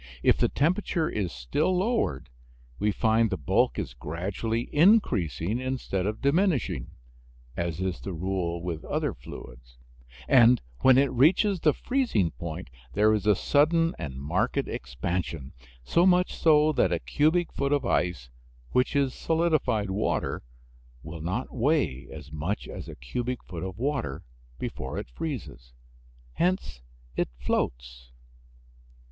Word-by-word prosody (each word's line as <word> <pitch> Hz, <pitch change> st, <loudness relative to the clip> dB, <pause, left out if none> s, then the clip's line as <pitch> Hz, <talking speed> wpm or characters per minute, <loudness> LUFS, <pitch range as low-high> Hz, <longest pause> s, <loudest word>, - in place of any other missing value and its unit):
If -, -, +5 dB
the -, -, +2 dB
temperature 165 Hz, +1 st, +1 dB
is 95 Hz, -5 st, -2 dB
still 145 Hz, -, 0 dB
lowered 185 Hz, -, 0 dB, 0.5 s
we 105 Hz, -, +2 dB
find 110 Hz, +1 st, +2 dB
the 95 Hz, -, -2 dB
bulk 65 Hz, -4 st, +1 dB
is -, -, -3 dB
gradually 95 Hz, -, -3 dB
increasing 120 Hz, -, +3 dB
instead 130 Hz, -7 st, -2 dB
of 110 Hz, +4 st, -4 dB
diminishing 140 Hz, -, +1 dB, 0.7 s
(as 85 Hz, -1 st, -2 dB
is 95 Hz, -1 st, -2 dB
the 100 Hz, -, -6 dB
rule 85 Hz, -1 st, -2 dB
with 85 Hz, -3 st, -4 dB
other -, -, -1 dB
fluids), -, -, -12 dB, 0.5 s
and 120 Hz, -2 st, +6 dB, 0.2 s
when 130 Hz, -1 st, +6 dB
it 140 Hz, 0 st, +4 dB
reaches 175 Hz, -, +4 dB
the 155 Hz, -2 st, +3 dB
freezing 240 Hz, -, 0 dB
point 85 Hz, -4 st, -7 dB, 0.2 s
there 105 Hz, +2 st, +4 dB
is 105 Hz, 0 st, -1 dB
a 105 Hz, -, +6 dB
sudden 165 Hz, -, +3 dB
and 70 Hz, -3 st, -5 dB
marked 70 Hz, +2 st, -1 dB
expansion, 65 Hz, +3 st, -4 dB, 0.3 s
so 170 Hz, -, +3 dB
much 180 Hz, 0 st, +3 dB
so 155 Hz, -1 st, +4 dB
that 95 Hz, -, +2 dB
a 85 Hz, -, +2 dB
cubic 155 Hz, -, +1 dB
foot 140 Hz, -, -1 dB
of 145 Hz, -3 st, +1 dB
ice, 70 Hz, -, 0 dB, 0.4 s
which 125 Hz, +3 st, +1 dB
is 140 Hz, -2 st, +2 dB
solidified 155 Hz, -, +1 dB
water, 105 Hz, +3 st, -1 dB, 0.6 s
will 80 Hz, +3 st, -7 dB
not 95 Hz, +10 st, -3 dB
weigh 125 Hz, -, 0 dB
as 75 Hz, -, -10 dB
much 80 Hz, +7 st, -3 dB
as -, -, -7 dB
a -, -, -8 dB
cubic 120 Hz, -, -4 dB
foot 85 Hz, -2 st, -7 dB
of 95 Hz, 0 st, -5 dB
water 125 Hz, -, -2 dB, 0.3 s
before 65 Hz, -, -5 dB
it -, -, -6 dB
freezes 60 Hz, -, -6 dB, 0.6 s
hence 180 Hz, -, 0 dB, 0.3 s
it -, -, 0 dB
floats. -, -, -3 dB
105 Hz, 140 wpm, -27 LUFS, -, 0.7 s, and